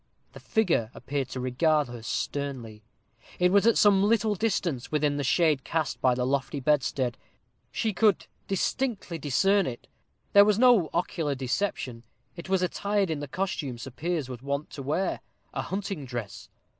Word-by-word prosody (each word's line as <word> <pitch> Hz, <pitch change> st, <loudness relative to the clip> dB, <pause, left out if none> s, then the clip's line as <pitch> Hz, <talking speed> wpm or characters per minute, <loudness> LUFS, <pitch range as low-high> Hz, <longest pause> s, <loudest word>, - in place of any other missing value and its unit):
The -, -, -10 dB
figure 180 Hz, -, +1 dB
appeared 140 Hz, -1 st, -3 dB
to 130 Hz, -, -5 dB
regard 150 Hz, +4 st, +2 dB
her 120 Hz, -1 st, -8 dB
sternly. 120 Hz, -3 st, -4 dB, 0.6 s
It 180 Hz, 0 st, +3 dB
was 200 Hz, +3 st, +4 dB
at 230 Hz, -, +4 dB
some 200 Hz, -2 st, +5 dB
little 215 Hz, 0 st, +2 dB
distance, 175 Hz, -, -1 dB
within 150 Hz, -1 st, +1 dB
the 145 Hz, -, -1 dB
shade 150 Hz, 0 st, +2 dB
cast 160 Hz, -3 st, -2 dB
by 125 Hz, -1 st, +3 dB
the 125 Hz, 0 st, -1 dB
lofty 140 Hz, +2 st, -1 dB
bedstead. 130 Hz, -3 st, +1 dB
Still -, -, -39 dB
she 220 Hz, -2 st, -1 dB
could 210 Hz, 0 st, +3 dB, 0.2 s
distinctly 195 Hz, -3 st, -2 dB
discern 195 Hz, +8 st, +2 dB
it. 120 Hz, -2 st, -6 dB, 0.5 s
There 200 Hz, -, +9 dB
was 205 Hz, -1 st, +3 dB
no 235 Hz, -9 st, +5 dB
ocular 165 Hz, -4 st, -1 dB
deception; 130 Hz, -2 st, -2 dB, 0.3 s
it 170 Hz, +1 st, -9 dB
was 190 Hz, -1 st, +2 dB
attired 200 Hz, 0 st, 0 dB
in 155 Hz, -, -2 dB
the 145 Hz, -, -5 dB
costume 150 Hz, -6 st, -3 dB
Sir 135 Hz, +3 st, -8 dB
Piers 155 Hz, +2 st, -2 dB
was 125 Hz, -2 st, -8 dB
wont 140 Hz, +2 st, -3 dB
to 140 Hz, -, -7 dB
wear 155 Hz, +8 st, -1 dB, 0.3 s
a -, -, -2 dB
hunting 190 Hz, -6 st, -4 dB
dress. 120 Hz, -5 st, -6 dB
155 Hz, 170 wpm, -27 LUFS, 130-195 Hz, 0.6 s, There